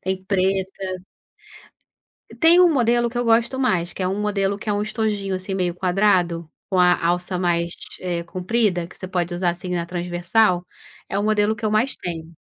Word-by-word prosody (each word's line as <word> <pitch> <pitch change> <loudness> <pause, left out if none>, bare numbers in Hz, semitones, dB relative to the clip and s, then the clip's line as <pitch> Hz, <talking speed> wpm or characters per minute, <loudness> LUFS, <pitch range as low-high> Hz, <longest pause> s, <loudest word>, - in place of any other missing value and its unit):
tem 190 0 -3
preta 190 -1 -1 1.4
Tem 340 +2 +7
um 355 -2 +6
modelo 240 -3 +2
que 240 - -9
eu 245 - 0
gosto 235 +3 +2
mais, 185 -10 +1
que 190 - -5
é 185 - +1
um 195 +2 -2
modelo 200 -1 0
que 215 - -8
é - - +2
um 205 0 0
estojinho, 210 -3 -2
assim, 185 +1 -5
meio 180 -2 -1
quadrado, 180 -3 +1 0.2
com 185 - 0
a 180 -1 +4
alça 180 +1 0
mais, 170 -1 0 0.3
eh, 175 -2 -3
comprida, 185 0 0
que - - -14
você 185 - -7
pode 175 -1 -2
usar 175 0 +1
assim 175 +1 -7
na 170 -1 -1
transversal. 175 +2 +1 0.4
É - - -3
o - - 0
modelo 215 0 +2
que 230 0 -9
eu 215 - +1
mais 220 +5 +1
tenho. 165 -2 -6
190 Hz, 195 wpm, -22 LUFS, 175-215 Hz, 1.4 s, Tem